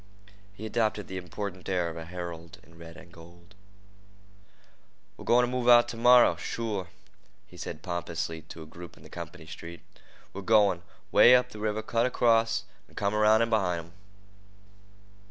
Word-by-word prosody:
He 100 +2 -9
adopted 110 -2 -1
the 95 - -6
important 95 +1 -6
air 90 -2 0
of 80 - -6
a 80 -1 -7
herald 85 -1 -8
in 85 - -20
red 85 0 -12
and 85 -2 -15
gold. 85 +3 -16 1.6
"We're - - -12
goin' 125 +1 +4
t' 120 - -5
move 125 -1 -2
t'morrah—sure," 120 -4 +4 0.6
he 95 - -18
said 75 -2 -7
pompously 85 -2 -4
to 80 +1 -11
a - - -12
group 85 +2 -12
in - - -17
the - - -14
company 80 - -9
street. 85 +2 -10 0.5
"We're 100 - -6
goin' 100 -4 +3 0.3
'way 125 - +8
up 125 0 +1
the 110 - -10
river, 110 0 -2
cut 115 +2 +1
across, 115 -2 +2 0.3
an' - - -22
come 100 +1 -1
around 105 +1 +4
in 115 - -2
behint 90 -6 0
'em." 85 - -20
100 Hz, 160 wpm, -28 LUFS, 85-115 Hz, 1.6 s, way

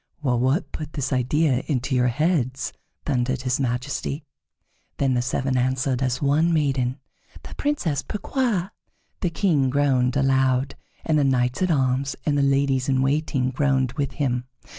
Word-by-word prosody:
"Wh 130 -4 +2
what 135 +4 +1
put 155 0 -7
this 140 -2 -2
idea 130 +1 +2
into 130 -2 -1
your 125 -1 +3
heads?" 130 -1 0 0.3
thundered 130 -2 0
his 125 0 0
Majesty. 135 +3 -2 0.7
Then 135 -2 +1
the 120 - +1
seven 130 +1 -1
answered 130 +1 0
as 130 +1 -1
one 150 +4 +3
maiden: 135 -5 +1 0.5
"The - - -9
Princess 175 - -1
Pourquoi." 210 -3 -1 0.5
The 180 - 0
King 155 -5 +1
groaned 130 -2 +2
aloud, 135 -1 +2 0.3
and 155 -2 +2
the - - +3
knights 125 0 +1
at 185 - +2
arms 135 -2 +1
and 150 - +1
the 145 - +2
ladies 135 -1 +2
in 130 -1 +2
waiting 135 -2 0
groaned 130 -2 +1
with 140 -1 -3
him. 125 -4 -1
135 Hz, 155 wpm, -24 LUFS, 130-150 Hz, 0.7 s, your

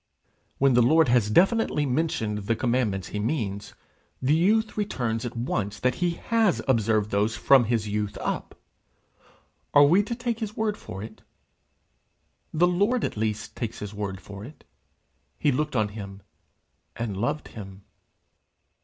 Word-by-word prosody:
When 135 -1 +4
the 120 - +5
Lord 155 +4 +4
has 120 -4 +3
definitely 185 - +3
mentioned 125 -7 -1
the 115 - +2
commandments 115 -7 0
he 105 - -4
means, 105 -4 -3 0.4
the 130 +3 +2
youth 215 +7 +2
returns 125 - -2
at 120 0 -5
once 105 -4 -2
that 125 +3 +1
he 175 -1 +1 0.2
has 225 -5 +3
observed 110 -4 +2
those 105 +2 +1
from 135 -3 +5
his 110 -1 0
youth 105 0 -2
up: - - -4 1.2
are 145 - +9
we 170 +8 +5
to 210 +3 -4
take 240 -1 -3
his 215 -2 -5
word 220 -1 0
for 95 - -8
it? 110 0 -10 1.3
The 165 +3 +3
Lord 205 +8 +1
at - - -2
least 105 -1 -3
takes 115 -2 -4
his 105 0 -7
word 100 -2 -4
for 100 0 -10
it: 140 +7 -12 0.7
he 145 - +2
looked 150 +2 -1
on 110 -3 +2
him 100 -2 -9 0.7
and 115 -4 -3
loved 120 +10 -2
him. 100 -2 -10
120 Hz, 155 wpm, -26 LUFS, 105-160 Hz, 1.3 s, are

